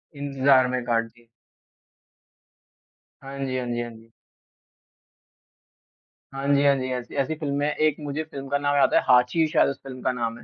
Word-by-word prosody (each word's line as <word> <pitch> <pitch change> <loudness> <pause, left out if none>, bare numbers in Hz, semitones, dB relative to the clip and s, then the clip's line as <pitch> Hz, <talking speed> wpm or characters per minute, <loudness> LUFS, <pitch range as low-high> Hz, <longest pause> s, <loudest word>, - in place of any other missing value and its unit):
इंतज़ार 135 -2 +3
में 125 0 -2
काट 115 -1 +1
दी। 115 +1 -21 1.9
हाँ 135 0 -9
जी, 130 -1 -2
हाँ 125 - -3
जी, 120 0 -2
हाँ 120 0 -6
जी। 115 0 -17 2.2
हाँ 135 +1 -4
जी, 140 0 +3
हाँ 140 -1 +5
जी, 130 -1 -3
ऐसी 125 -1 -6
ऐसी 140 +4 -2
फ़िल्में 145 -2 -2
एक 155 0 +1
मुझे 150 +1 -4
फ़िल्म 140 -3 -9
का 140 - +1
नाम 145 0 0
याद 140 - +4
आता - - +3
है, - - +4
हाँची 125 +6 +4
शायद 155 - +3
उस 140 - -6
फ़िल्म 130 -2 -9
का 130 - 0
नाम 115 -2 -3
है। - - -14
135 Hz, 185 wpm, -24 LUFS, 125-140 Hz, 2.2 s, हाँ